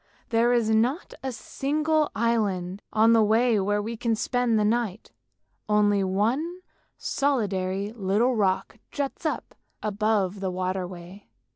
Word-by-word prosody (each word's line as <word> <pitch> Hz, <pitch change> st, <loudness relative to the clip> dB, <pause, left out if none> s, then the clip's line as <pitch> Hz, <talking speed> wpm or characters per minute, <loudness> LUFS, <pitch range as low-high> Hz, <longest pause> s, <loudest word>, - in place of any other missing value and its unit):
There 235 Hz, +1 st, +3 dB
is 235 Hz, -3 st, +2 dB
not 240 Hz, -, +1 dB
a 265 Hz, -, -3 dB
single 305 Hz, +5 st, 0 dB
island 205 Hz, -5 st, 0 dB
on 220 Hz, +2 st, +5 dB
the 225 Hz, -, +5 dB
way 220 Hz, +1 st, +3 dB
where 205 Hz, +1 st, 0 dB
we 230 Hz, +2 st, -4 dB
can 230 Hz, 0 st, 0 dB
spend 245 Hz, 0 st, +1 dB
the 210 Hz, -, +2 dB
night, 220 Hz, -2 st, -1 dB, 0.6 s
only 205 Hz, -1 st, +3 dB
one 245 Hz, -, 0 dB, 0.4 s
solitary 200 Hz, -7 st, -1 dB
little 220 Hz, +4 st, +1 dB
rock 195 Hz, +1 st, 0 dB
juts 285 Hz, +3 st, -3 dB
up -, -, -4 dB, 0.3 s
above 210 Hz, -2 st, 0 dB
the 190 Hz, -1 st, -2 dB
water 185 Hz, 0 st, -2 dB
midway. 180 Hz, +2 st, -11 dB
215 Hz, 135 wpm, -26 LUFS, 195-240 Hz, 0.6 s, on